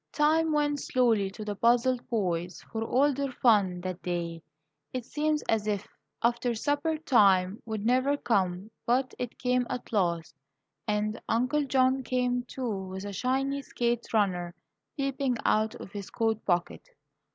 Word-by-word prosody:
Time 315 Hz, +2 st, +3 dB
went 295 Hz, -1 st, +1 dB
slowly 230 Hz, -8 st, +2 dB
to 210 Hz, +2 st, -8 dB
the 205 Hz, -1 st, -3 dB
puzzled 240 Hz, +3 st, +2 dB
boys, 180 Hz, -6 st, -1 dB
for 225 Hz, -1 st, -2 dB
all 275 Hz, +5 st, +3 dB
their 275 Hz, 0 st, -2 dB
fun 200 Hz, -8 st, +3 dB
that 185 Hz, 0 st, -5 dB
day. 170 Hz, -2 st, -3 dB, 0.5 s
It 255 Hz, -2 st, -4 dB
seemed 300 Hz, +2 st, 0 dB
as 215 Hz, -1 st, +1 dB
if 205 Hz, -1 st, -1 dB, 0.4 s
"after 240 Hz, 0 st, +1 dB
supper 290 Hz, +6 st, 0 dB
time" 200 Hz, -9 st, +3 dB
would 220 Hz, -1 st, -3 dB
never 260 Hz, +4 st, +3 dB
come; 195 Hz, -4 st, 0 dB, 0.2 s
but 255 Hz, +2 st, +2 dB
it 245 Hz, -2 st, -4 dB
came 250 Hz, -1 st, +1 dB
at 245 Hz, -, -5 dB
last, 170 Hz, -5 st, 0 dB, 0.5 s
and 210 Hz, +1 st, -1 dB
Uncle 255 Hz, +6 st, +1 dB
John 260 Hz, 0 st, +3 dB
came, 250 Hz, -1 st, 0 dB
too, 225 Hz, -7 st, -4 dB
with 190 Hz, +1 st, -6 dB
a 200 Hz, -, -5 dB
shiny 270 Hz, +5 st, 0 dB
skate 240 Hz, -3 st, -2 dB
runner 180 Hz, -5 st, 0 dB, 0.4 s
peeping 275 Hz, -2 st, 0 dB
out 215 Hz, 0 st, +2 dB
of -, -, -10 dB
his 200 Hz, -2 st, -7 dB
coat 225 Hz, -1 st, 0 dB
pocket. 175 Hz, -, -1 dB
235 Hz, 150 wpm, -29 LUFS, 200-260 Hz, 0.5 s, Time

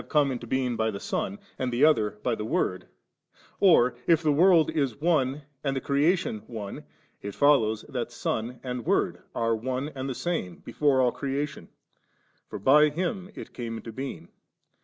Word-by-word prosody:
come 145 Hz, -3 st, +3 dB
into 120 Hz, -2 st, -5 dB
being 125 Hz, -1 st, 0 dB
by 110 Hz, 0 st, 0 dB
the 100 Hz, -2 st, -5 dB
Son 100 Hz, 0 st, -3 dB, 0.2 s
and 130 Hz, -1 st, -1 dB
the 125 Hz, +5 st, +4 dB
other 110 Hz, -9 st, +2 dB
by 125 Hz, -, +1 dB
the 110 Hz, -, -3 dB
Word, 95 Hz, -4 st, -1 dB, 0.7 s
or, 160 Hz, -11 st, +5 dB
if 165 Hz, -1 st, +4 dB
the 155 Hz, -, +3 dB
world 165 Hz, +1 st, +5 dB
is 140 Hz, -6 st, -1 dB
one 145 Hz, -3 st, +1 dB, 0.2 s
and 135 Hz, -1 st, -1 dB
the -, -, 0 dB
crea 145 Hz, +7 st, +2 dB
tion 110 Hz, -, -4 dB
one, 105 Hz, -4 st, -7 dB, 0.4 s
it 100 Hz, -1 st, -6 dB
follows 115 Hz, -7 st, +3 dB
that 120 Hz, -2 st, -4 dB
Son 120 Hz, 0 st, -3 dB
and 125 Hz, -2 st, -4 dB
Word -, -, +1 dB
are 115 Hz, 0 st, +1 dB
one 130 Hz, +5 st, -3 dB
and 135 Hz, -2 st, -5 dB
the 130 Hz, -, -3 dB
same 155 Hz, -, -3 dB
before 140 Hz, -3 st, +2 dB
all 125 Hz, -1 st, +3 dB
creation, 140 Hz, +2 st, -4 dB, 0.8 s
for -, -, -5 dB
by 150 Hz, +8 st, +5 dB
Him 180 Hz, +4 st, -3 dB
it -, -, -9 dB
came 115 Hz, -2 st, -5 dB
into 115 Hz, -, -8 dB
being. 130 Hz, +4 st, -6 dB
130 Hz, 180 wpm, -27 LUFS, 115-150 Hz, 0.8 s, or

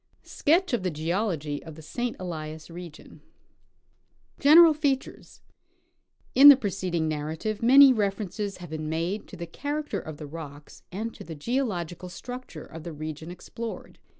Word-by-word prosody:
SKETCH 340 Hz, +2 st, +1 dB
OF 235 Hz, -, +1 dB
THE 185 Hz, -, -1 dB
GEOLOGY 160 Hz, -2 st, -2 dB
OF 160 Hz, -2 st, -10 dB
THE 160 Hz, -, -12 dB
ST. 240 Hz, +9 st, -3 dB
ELIAS 160 Hz, -3 st, -6 dB
REGION. 170 Hz, -3 st, -11 dB, 1.2 s
General 320 Hz, +3 st, +8 dB
Features. 285 Hz, -3 st, -3 dB, 0.9 s
Ill 280 Hz, +2 st, +10 dB
the 285 Hz, -, +11 dB
preceding 185 Hz, -7 st, -2 dB
narrative, 155 Hz, +8 st, -3 dB
many 265 Hz, +3 st, +8 dB
references 205 Hz, -1 st, -2 dB
have 175 Hz, -3 st, -10 dB
been 155 Hz, -1 st, -4 dB
made 170 Hz, +6 st, -2 dB
to 190 Hz, -, -11 dB
the 170 Hz, -, -5 dB
character 290 Hz, -, -4 dB
of 155 Hz, -3 st, -8 dB
the 150 Hz, -, -8 dB
rocks 145 Hz, -1 st, -10 dB
and 220 Hz, +5 st, -4 dB
to -, -, -11 dB
the 160 Hz, 0 st, -8 dB
geological 180 Hz, -, -3 dB
structure 245 Hz, -4 st, -8 dB
of 165 Hz, -, -10 dB
the 170 Hz, +1 st, -7 dB
region 155 Hz, +1 st, -7 dB
explored. 225 Hz, +6 st, -8 dB
180 Hz, 150 wpm, -26 LUFS, 160-240 Hz, 1.2 s, the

